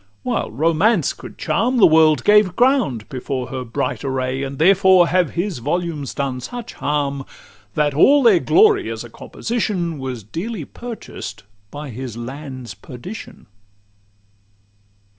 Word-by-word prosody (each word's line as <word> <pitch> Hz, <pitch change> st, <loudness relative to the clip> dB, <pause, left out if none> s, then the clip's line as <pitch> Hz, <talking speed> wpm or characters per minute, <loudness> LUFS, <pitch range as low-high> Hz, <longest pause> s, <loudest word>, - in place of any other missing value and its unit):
While -, -, -1 dB
Romance 165 Hz, -, +2 dB
could -, -, -12 dB
charm, 250 Hz, +2 st, 0 dB
The 225 Hz, -, +7 dB
world 155 Hz, -4 st, +5 dB
gave 210 Hz, -3 st, +4 dB
ground 240 Hz, -, +2 dB
before 130 Hz, -2 st, -4 dB
her 130 Hz, -1 st, -4 dB
bright 125 Hz, +4 st, -3 dB
array; 130 Hz, -1 st, -2 dB
And 140 Hz, 0 st, -5 dB
therefore 185 Hz, +1 st, +5 dB
have 180 Hz, -2 st, +1 dB
his 175 Hz, -4 st, -2 dB
volumes 150 Hz, +1 st, -3 dB
done 135 Hz, -2 st, -2 dB
such 240 Hz, -, -7 dB
harm, 140 Hz, -2 st, -2 dB, 0.5 s
That 150 Hz, -1 st, +1 dB
all 275 Hz, -, +5 dB
their 215 Hz, -7 st, +6 dB
glory, 405 Hz, -, +4 dB
as -, -, -5 dB
a -, -, -12 dB
composition, 185 Hz, -9 st, -3 dB
Was 130 Hz, -4 st, -5 dB
dearly 170 Hz, -, -5 dB
purchased 235 Hz, -, -8 dB, 0.3 s
by 145 Hz, +1 st, -7 dB
his 120 Hz, -1 st, -7 dB
land's 130 Hz, 0 st, -7 dB
perdition. 180 Hz, -, -10 dB
155 Hz, 135 wpm, -20 LUFS, 130-200 Hz, 0.5 s, The